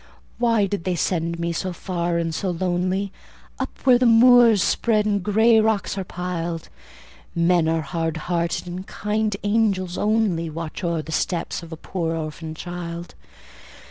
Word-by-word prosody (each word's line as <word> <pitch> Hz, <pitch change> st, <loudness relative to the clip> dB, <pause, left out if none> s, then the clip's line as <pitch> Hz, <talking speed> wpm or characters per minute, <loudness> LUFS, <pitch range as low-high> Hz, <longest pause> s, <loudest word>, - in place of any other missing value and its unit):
Why 230 Hz, -4 st, +3 dB
did 195 Hz, -3 st, -3 dB
they 185 Hz, 0 st, -1 dB
send 170 Hz, -1 st, -1 dB
me 170 Hz, 0 st, -2 dB
so 185 Hz, +2 st, -3 dB
far 170 Hz, -1 st, -2 dB
and 165 Hz, -1 st, -1 dB
so 190 Hz, +4 st, -2 dB
lonely, 185 Hz, +2 st, -1 dB, 0.5 s
Up -, -, -2 dB
where 250 Hz, -2 st, +6 dB
the 250 Hz, -, +4 dB
moors 235 Hz, -3 st, +7 dB
spread 215 Hz, -2 st, +2 dB
and 205 Hz, -1 st, +1 dB
grey 220 Hz, +3 st, +4 dB
rocks 220 Hz, -3 st, +1 dB
are 195 Hz, -, -3 dB
piled? 175 Hz, -2 st, -4 dB, 0.7 s
Men 170 Hz, -1 st, +3 dB
are 165 Hz, 0 st, +1 dB
hard 165 Hz, +2 st, -2 dB
hearted, 170 Hz, -1 st, -1 dB
and 180 Hz, +2 st, -6 dB
kind 210 Hz, -1 st, -1 dB
angels 205 Hz, -4 st, +1 dB
only 205 Hz, -6 st, +1 dB
Watch 160 Hz, +2 st, -6 dB
o'er 170 Hz, -2 st, -1 dB
the 160 Hz, -, -8 dB
steps 170 Hz, +3 st, -1 dB
of 170 Hz, 0 st, -11 dB
a 160 Hz, -, -6 dB
poor 165 Hz, -1 st, -3 dB
orphan 155 Hz, 0 st, -5 dB
child. 175 Hz, 0 st, -6 dB
180 Hz, 160 wpm, -23 LUFS, 170-210 Hz, 0.7 s, moors